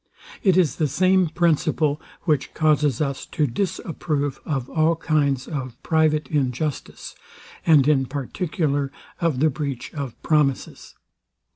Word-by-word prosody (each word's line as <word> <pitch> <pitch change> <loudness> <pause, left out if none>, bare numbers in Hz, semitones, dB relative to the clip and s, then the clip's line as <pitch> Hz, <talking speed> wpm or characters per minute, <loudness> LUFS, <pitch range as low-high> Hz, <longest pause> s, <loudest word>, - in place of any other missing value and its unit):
It 190 -3 +3
is 155 -8 +2
the 155 - +1
same 185 +5 +3
principle, 155 -2 +1 0.2
which 150 -6 0
causes 150 -4 +2
us 140 -2 -2
to 150 - 0
disapprove 150 -2 -2
of 135 -5 -2
all 160 +2 +2
kinds 145 -5 0
of 130 -6 -5
private 155 -2 +2
injustice, 145 0 -2 0.5
and 150 -4 +6
in 135 -3 +3
particular 145 0 -2 0.3
of 165 -7 0
the 155 0 +4
breach 135 -3 -5
of 140 -6 -6
promises. 150 -4 0
150 Hz, 125 wpm, -23 LUFS, 140-160 Hz, 0.5 s, and